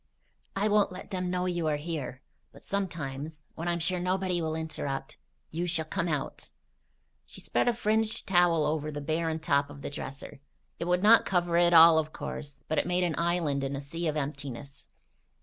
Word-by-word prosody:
I 200 +2 +1
won't 210 -2 +3
let 185 +3 -9
them 180 -1 -2
know 180 0 0
you 175 -3 -1
are 150 -1 +1
here; 145 -4 -5 0.3
but - - -17
sometimes, 155 -6 -4
when 165 - -5
I'm 175 0 +1
sure 175 +2 0
nobody 185 0 0
will 160 -1 -1
interrupt, 145 -4 -4 0.3
you 170 +3 -2
shall 165 -2 0
come 170 +2 -2
out." 150 -4 -3 0.8
She - - -11
spread - - 0
a 240 - +4
fringed 220 -1 0
towel 175 -4 +4
over 150 0 -1
the 145 - -4
barren 160 +2 -1
top 145 -3 +1
of 140 -1 -11
the - - -4
dresser. 140 0 -7 0.4
It 170 - -2
would 180 +2 +1
not 225 +2 +7
cover 175 -2 +1
it 175 0 +5
all, 165 -1 +9
of 155 0 -3
course; 145 -1 -6
but 155 - +1
it - - -1
made 180 0 +1
an 175 -2 +1
island 170 -5 +1
in 135 +1 -2
a - - -3
sea 165 +4 -4
of 155 0 -1
emptiness. 140 -1 -6
165 Hz, 195 wpm, -29 LUFS, 145-180 Hz, 0.8 s, all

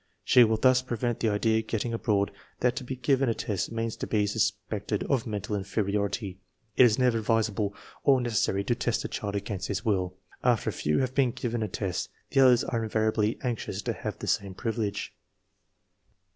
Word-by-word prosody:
She 125 - +7
will 110 -1 +2
thus 130 +2 +4
prevent 120 -2 -2
the 115 - +2
idea 110 +2 +2
get 110 -1 -3
ting 120 - -2
abroad 105 -3 +1 0.3
that 125 -1 +2
to - - -3
be 130 +1 -4
given 130 +1 +2
a 115 - 0
test 100 -1 -2
means 115 -1 -2
to - - -4
be 105 -2 +2
sus 105 - +2 0.2
pected - - -2
of 130 -4 0
mental 105 -1 -3
inferiority. 100 0 -2 0.4
It 130 - +8
is 115 -3 +3
never 125 -3 +3
advisable 110 -2 0 0.3
or 135 -2 +5
necessary 110 -5 0
to 120 - +1
test 120 -1 -1
a - - 0
child 100 -1 -4
against 100 -1 -3
his 100 0 -3
will. 95 -4 0 0.3
After 120 -4 +2
a - - -11
few 75 0 0
have 130 -1 -1
been 130 -2 +3
given 120 -1 -3
a 110 - 0
test 95 -1 -3 0.2
the - - +3
others 125 -3 +6
are 115 -2 -1
invariably 110 0 +1
anx 120 -3 -2
ious - - -4
to - - -1
have - - -5
the - - -6
same 100 -2 -1
privilege. 110 -3 -3
110 Hz, 200 wpm, -28 LUFS, 100-120 Hz, 0.4 s, It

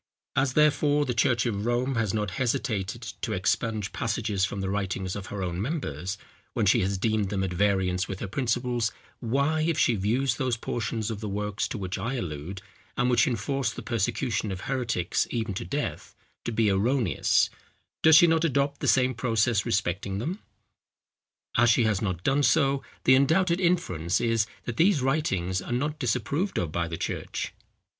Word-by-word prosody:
As, 135 -2 +2
therefore, 150 0 +3
the 125 - -1
church 120 0 +2
of 105 -2 -1
Rome 125 +3 +1
has 115 -5 0
not 105 -2 -1
hesitated 115 -2 -1 0.2
to 110 - -2
expunge 105 +2 -1
passages 110 -4 0
from 100 - -5
the 95 0 -2
writings 95 -2 -2
of 100 -1 -6
her 100 -2 -4
own 90 0 -2
members, 100 - -3 0.4
when - - +1
she - - +5
has 95 +1 0
deemed 110 0 0
them 95 -2 -1
at 95 -2 -2
variance 95 -1 +1
with 95 -1 -5
her - - -4
principles, 120 0 0 0.3
why, 140 +6 +1
if 160 0 +1
she 120 - +3
views 115 +5 0
those 130 -4 0
portions 115 -1 -3
of 105 - -5
the 105 -1 -4
works 105 +1 -2
to - - -5
which 95 -1 -4
I 115 +8 -2
allude, 90 - -5 0.3
and 125 -1 +2
which 120 -1 +4
enforce 125 +2 -1
the - - -8
persecution 110 -1 -1
of 95 -1 -5
heretics 120 -10 -1
even 115 -3 -2
to 95 - -4
death, 145 +1 -4 0.3
to - - -1
be 110 -2 +2
erroneous, 105 - +2 0.5
does 160 -1 +7
she 165 - +9
not 165 -1 +3
adopt 140 -2 0
the - - -1
same 130 -1 +4
process 115 -3 +1
respecting 95 0 -1
them? 165 - -3 1.2
As 120 +1 +5
she 115 +2 +4
has 105 -3 +1
not 90 -5 -2
done 140 +2 +2
so, 140 +1 +3 0.2
the 130 - +6
undoubted 170 +7 +3
inference 95 - +1
is, 115 -2 +1 0.2
that 120 -1 -4
these 180 -1 +4
writings 95 - 0
are - - -7
not 145 +5 -1
disapproved 140 - -1
of 85 -4 -1
by 85 +1 -1
the 80 0 -5
church. - - -4
115 Hz, 180 wpm, -27 LUFS, 100-135 Hz, 1.2 s, she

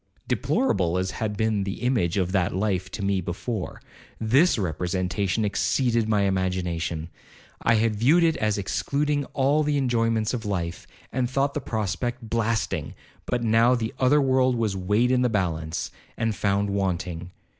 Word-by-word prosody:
'Deplorable 90 - +1
as 95 +1 -1
had 105 -2 -3
been 110 -2 +1
the 95 0 -5
image 110 -9 +1
of 90 -2 0
that 95 -3 +1
life 95 -2 -1
to 100 - -6
me 100 -1 +1
before, 90 +3 -4 0.4
this 130 +11 +4
representation 90 +3 -1
exceeded 115 +2 +1
my 105 -2 +3
imagination. 90 -4 -1 0.5
I 115 - +3
had 110 0 +2
viewed 150 +11 +4
it 165 -1 +3
as 105 -1 0
excluding 145 +8 -1
all 140 +3 +1
the 150 -1 +1
enjoyments 115 -4 +1
of 120 -3 -3
life, 90 -5 -3 0.3
and 125 -1 0
thought 140 +2 0
the 150 - -2
prospect 115 +2 -3
blasting; 115 -1 -1 0.3
but 120 -1 -1
now 115 +2 +4
the 115 -2 -3
other 135 +3 +4
world 130 -2 +3
was 110 -4 0
weighed 105 +6 +1
in 125 -1 +3
the 125 - +2
balance, 85 -6 -2 0.3
and 115 -1 0
found 100 0 0
wanting. 90 -3 -2
110 Hz, 155 wpm, -25 LUFS, 95-125 Hz, 0.5 s, this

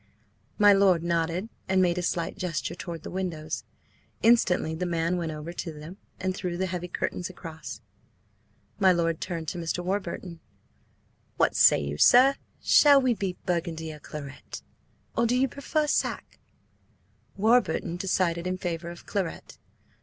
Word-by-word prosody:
My 205 -1 +7
lord 190 -4 +4
nodded, 170 +3 -1 0.2
and 190 0 +3
made 180 -1 +2
a - - -1
slight 170 -1 -2
gesture 175 -2 -3
toward 170 -2 -7
the - - -7
windows. 165 -4 -4 0.6
Instantly 190 -8 +3
the 180 +3 -2
man 170 +1 0
went 170 -3 -2
over 155 +2 -6
to 175 -1 -5
them 155 +5 -10 0.2
and 185 0 -1
drew 180 -2 -4
the 190 - 0
heavy 180 -1 -4
curtains 180 0 -3
across. 165 -3 -9 1.0
My 190 -2 +6
lord 165 -2 0
turned 170 -3 -4
to 175 - -5
Mr. 170 +1 -3
Warburton. 180 -2 -3 1.0
"What - - +2
say - - +6
you, 70 +1 -4
sir? 260 +3 +7 0.3
Shall 285 -3 +6
it 240 -3 +1
be 190 -3 -2
burgundy 165 -3 -2
or 150 - -11
claret, 145 -2 -9 0.5
or 235 0 +2
do 245 - +1
you 265 +1 +3
prefer 300 +4 -1
sack?" 295 - -2 1.0
Warburton 215 -5 +2
decided 180 -2 0
in 185 0 -2
favour 170 -1 -4
of 175 - -11
claret. 190 -5 -4
180 Hz, 155 wpm, -27 LUFS, 165-190 Hz, 1.0 s, My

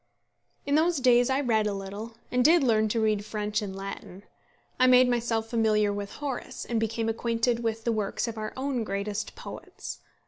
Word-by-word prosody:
In 285 - -1
those 325 +2 +3
days 245 -1 +4
I 265 +1 +2
read 220 -5 +2
a 205 - -1
little, 205 +4 -7
and 250 0 +2
did 325 +2 +6
learn 220 -3 +3
to 230 - 0
read 215 -2 +1
French 210 0 -2
and 195 -2 -5
Latin. 195 0 -7 0.6
I 255 - +6
made 255 0 +7
myself 235 -2 0
familiar 215 -3 +2
with 200 0 -5
Horace, 280 -4 -5
and 235 -2 -1
became 225 +1 -1
acquainted 230 +1 0
with 225 -1 -2
the 235 - +1
works 215 +1 -1
of 230 - -4
our 215 -1 -4
own 260 -3 -1
greatest 200 +1 -3
poets. - - -8
225 Hz, 185 wpm, -27 LUFS, 210-245 Hz, 0.6 s, made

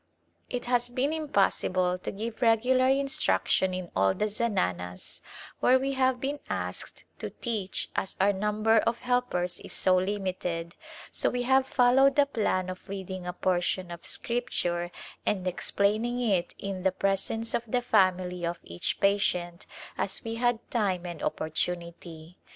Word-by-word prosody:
It 245 -1 -3
has 245 0 +1
been 260 +5 0
impossible 185 - +1
to - - -4
give 220 +4 -5
regular 250 +3 +4
instruction 260 - +2
in 185 -1 -5
all 95 0 +3
the 210 - 0
zananas 90 - -2 0.4
where 255 - +5
we 270 +1 -1
have 260 -1 +2
been 280 +3 -2
asked - - -4
to - - -4
teach 215 -6 -3
as 190 - -2
our 200 +1 +4
number 210 +3 +2
of 230 +2 0
helpers 245 -8 0
is - - -7
so 185 -1 +3
limited, 185 -3 -2 0.4
so - - 0
we 245 0 -1
have 265 +1 +3
fol 245 -2 +4
lowed 270 +1 +5
the 285 - +5
plan 210 -8 0
of 185 +2 -8
reading 190 -2 -5
a 180 - -3
portion 180 0 0
of 170 0 -8
Scripture 175 -8 -1 0.3
and 190 -3 0
explaining 210 +6 0
it 200 -8 0
in 195 -2 -4
the 190 0 +2
presence 195 +4 -1
of - - +1
the 245 +2 0
family 185 -4 +2
of 170 0 -1
each 85 +1 -3
patient 180 -3 +1 0.3
as 195 - -1
we 225 - -4
had 240 0 +2
time 190 -6 0
and 170 -2 -6
opportunity. 170 0 -3
200 Hz, 155 wpm, -28 LUFS, 180-245 Hz, 0.4 s, where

